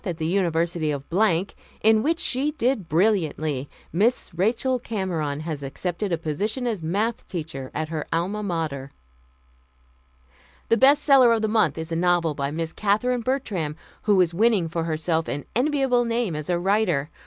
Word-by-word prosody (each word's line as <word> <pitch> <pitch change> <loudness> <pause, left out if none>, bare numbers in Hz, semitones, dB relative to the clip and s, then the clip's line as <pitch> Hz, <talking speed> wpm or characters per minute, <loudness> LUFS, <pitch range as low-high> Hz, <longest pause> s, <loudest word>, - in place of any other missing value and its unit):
at 175 -5 -3
the 160 - -3
University 170 -2 0
of 140 -2 -2 0.8
in 220 0 +5
which 325 +6 +1
she 265 +4 +2
did 245 - -1
brilliantly, 155 -7 +1 0.2
Miss 215 +8 +1
Rachel 235 +8 +1
Cameron 175 -10 -3
has 155 -3 -4
accepted 175 +8 -3
a 170 - +1
position 205 - -2
as 220 -7 -2
Math. 205 +8 -1
teacher 150 -7 -5
at 155 0 -2
her 155 -2 -4
Alma 180 +6 -1
Mater." 160 -8 -3 1.8
"The 230 - +4
best 275 +3 +5
seller 265 -4 +6
of 225 -1 +1
the - - +2
month 210 -9 +2
is 160 +1 -5
a - - 0
novel 170 -2 +2
by 140 -1 -2
Miss 160 +2 -4
Katherine 225 +4 +1
Bertram, 215 - -2 0.3
who 205 -3 +3
is 175 -2 +1
winning 210 -2 +3
for 165 0 -3
herself 160 0 -1
an 145 - -4
enviable 265 -2 +2
name 230 -6 -1
as 150 +1 -5
a 175 - +2
writer. 175 -6 +1
180 Hz, 165 wpm, -24 LUFS, 160-225 Hz, 1.8 s, seller